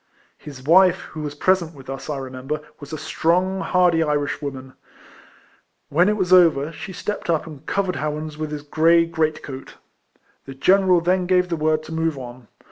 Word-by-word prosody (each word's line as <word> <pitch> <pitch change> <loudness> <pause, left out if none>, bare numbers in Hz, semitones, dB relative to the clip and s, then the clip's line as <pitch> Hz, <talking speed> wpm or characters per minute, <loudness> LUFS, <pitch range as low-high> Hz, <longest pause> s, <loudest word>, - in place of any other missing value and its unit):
His 140 -4 -11
wife, 180 +4 +5
who 155 - -7
was 145 -1 -6
])resent 175 -4 +2
with 135 -2 -14
us, 135 +2 -7
I 145 - -2
remember, 135 +3 -5 0.2
was 145 -2 -11
a 155 - -4
strong, 180 +5 0
hardy 180 -3 +2
Irishwoman. 145 -3 -2 1.2
AVhen 175 +6 +4
it 210 - 0
was 185 -2 +1
over, 165 -5 +5
she 190 - -8
stepped 205 0 -5
up 160 -2 +1
and 150 -3 -11
covered 190 -2 -1
Howans 150 0 -4
with 155 0 -4
his 150 -1 -6
grey 165 +3 +3
great 160 -2 -1
coat. 135 -1 -9 0.7
The 135 - -9
general 185 +4 +4
then 180 +1 +1
gave 180 -1 +2
the 170 - 0
word 155 0 0
to 155 - -11
move 160 -2 -1
on. 125 -2 -10
155 Hz, 180 wpm, -22 LUFS, 145-180 Hz, 1.2 s, wife